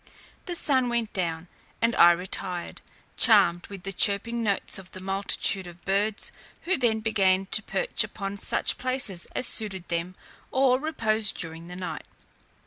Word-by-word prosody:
The 350 Hz, -, -3 dB
sun 260 Hz, -6 st, +1 dB
went 235 Hz, -2 st, -1 dB
down, 170 Hz, -3 st, -2 dB, 0.3 s
and 230 Hz, +1 st, +1 dB
I 175 Hz, -, +8 dB
retired, 180 Hz, 0 st, -4 dB, 0.4 s
charmed 195 Hz, -7 st, +4 dB
with 195 Hz, -3 st, -10 dB
the 195 Hz, -, -4 dB
chirping 215 Hz, +5 st, +1 dB
notes 200 Hz, -2 st, 0 dB
of 185 Hz, -1 st, -13 dB
the 185 Hz, -, -8 dB
multitude 195 Hz, 0 st, 0 dB
of 175 Hz, 0 st, -14 dB
birds, 205 Hz, +2 st, 0 dB, 0.3 s
who 375 Hz, +2 st, +2 dB
then 230 Hz, -6 st, +1 dB
began 195 Hz, -3 st, +2 dB
to 215 Hz, -, +1 dB
perch -, -, 0 dB
upon 200 Hz, -1 st, -6 dB
such -, -, 0 dB
places 255 Hz, -9 st, 0 dB
as 255 Hz, -, +3 dB
suited 195 Hz, -7 st, +1 dB
them 170 Hz, +2 st, -3 dB, 0.3 s
for 260 Hz, -1 st, +3 dB
repose 220 Hz, -8 st, +1 dB
during 165 Hz, 0 st, -7 dB
the 180 Hz, -, -8 dB
night. 185 Hz, 0 st, -6 dB
200 Hz, 155 wpm, -26 LUFS, 180-230 Hz, 0.4 s, I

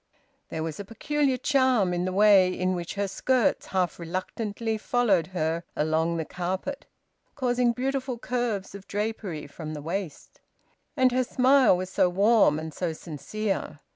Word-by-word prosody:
There 160 Hz, -, -3 dB
was 160 Hz, +1 st, -5 dB
a -, -, -4 dB
peculiar 270 Hz, +5 st, 0 dB
charm 255 Hz, -8 st, +2 dB
in 175 Hz, +1 st, -1 dB
the 185 Hz, -, -1 dB
way 195 Hz, -2 st, +5 dB
in 185 Hz, 0 st, -1 dB
which 175 Hz, +1 st, -4 dB
her 200 Hz, 0 st, -1 dB
skirts 250 Hz, +4 st, +1 dB
half 185 Hz, -2 st, -1 dB
reluctantly 205 Hz, +6 st, -3 dB
followed 210 Hz, -9 st, +2 dB
her 165 Hz, -2 st, -2 dB
along 160 Hz, +2 st, +1 dB
the 160 Hz, -, -2 dB
carpet, 185 Hz, -, -4 dB, 0.5 s
causing 245 Hz, -3 st, +2 dB
beautiful 260 Hz, 0 st, -2 dB
curves 235 Hz, -6 st, -2 dB
of 200 Hz, -1 st, -10 dB
drapery 205 Hz, -6 st, -3 dB
from 155 Hz, +2 st, -7 dB
the -, -, -5 dB
waist. 170 Hz, -1 st, -5 dB, 0.6 s
And 255 Hz, -1 st, +4 dB
her 255 Hz, +1 st, +2 dB
smile 255 Hz, -3 st, +4 dB
was 185 Hz, +1 st, -5 dB
so 180 Hz, -, +3 dB
warm 200 Hz, -3 st, +4 dB
and 160 Hz, 0 st, -6 dB
so 175 Hz, -3 st, -2 dB
sincere! 175 Hz, +2 st, -4 dB
195 Hz, 155 wpm, -26 LUFS, 175-245 Hz, 0.6 s, way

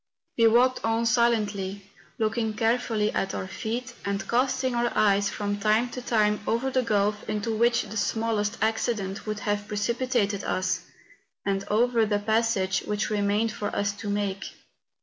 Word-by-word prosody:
We 230 Hz, -1 st, +5 dB
walked 250 Hz, +3 st, +3 dB
on 225 Hz, +1 st, +1 dB
silently, 210 Hz, -4 st, +1 dB, 0.3 s
looking 220 Hz, 0 st, 0 dB
carefully 225 Hz, -2 st, +1 dB
at 195 Hz, -, -1 dB
our -, -, -3 dB
feet, 235 Hz, +7 st, -4 dB
and 200 Hz, 0 st, -2 dB
casting 260 Hz, +1 st, +1 dB
our 240 Hz, 0 st, +1 dB
eyes 200 Hz, -1 st, +3 dB
rfrom 205 Hz, 0 st, -3 dB
time 215 Hz, +4 st, +2 dB
to 250 Hz, -, -6 dB
time 210 Hz, -3 st, +2 dB
over 245 Hz, +4 st, 0 dB
the 255 Hz, -, +2 dB
gulf 210 Hz, -2 st, 0 dB
into 215 Hz, +1 st, -1 dB
which 235 Hz, +1 st, +3 dB
the -, -, -11 dB
^hiallest 220 Hz, 0 st, 0 dB
accident 220 Hz, -3 st, -1 dB
would 215 Hz, 0 st, -3 dB
have 205 Hz, 0 st, -1 dB
precipitated 210 Hz, -1 st, 0 dB
us, 185 Hz, 0 st, -1 dB, 0.6 s
and 195 Hz, 0 st, -1 dB
over 230 Hz, +1 st, +2 dB
the 205 Hz, -1 st, +1 dB
passage 220 Hz, -2 st, +1 dB
which 210 Hz, +1 st, -1 dB
remained 210 Hz, +2 st, +1 dB
for 205 Hz, -, -4 dB
us 200 Hz, 0 st, +1 dB
to 205 Hz, 0 st, -5 dB
make. 200 Hz, -1 st, -2 dB
215 Hz, 155 wpm, -26 LUFS, 205-235 Hz, 0.6 s, We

